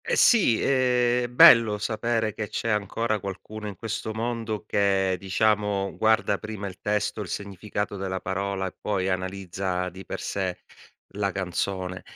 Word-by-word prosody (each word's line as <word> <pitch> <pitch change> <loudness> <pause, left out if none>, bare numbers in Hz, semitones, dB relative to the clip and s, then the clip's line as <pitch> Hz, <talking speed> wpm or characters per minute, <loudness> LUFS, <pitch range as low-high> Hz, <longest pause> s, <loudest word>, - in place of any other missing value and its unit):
Eh - - +1
sì, 195 - +5
è 125 -2 +2
bello 115 -3 +7
sapere 110 +1 -1
che 105 0 -5
c'è 115 - -3
ancora 110 +1 0
qualcuno 100 +3 -7
in 100 - -6
questo 110 +2 -4
mondo 115 -2 -3
che, 95 -2 +2
diciamo, 100 0 0
guarda 110 +1 +2
prima 105 -2 -6
il 95 -2 -7
testo, 105 +1 -1
il 100 - -5
significato 100 +2 -4
della 95 -1 -3
parola 95 0 -2
e 95 - -5
poi 95 -2 -1
analizza 95 -1 -2
di 95 +2 -11
per - - -6
sé 95 -2 -3 0.6
la 100 -1 0
canzone. 95 0 -3
100 Hz, 150 wpm, -26 LUFS, 95-110 Hz, 0.6 s, bello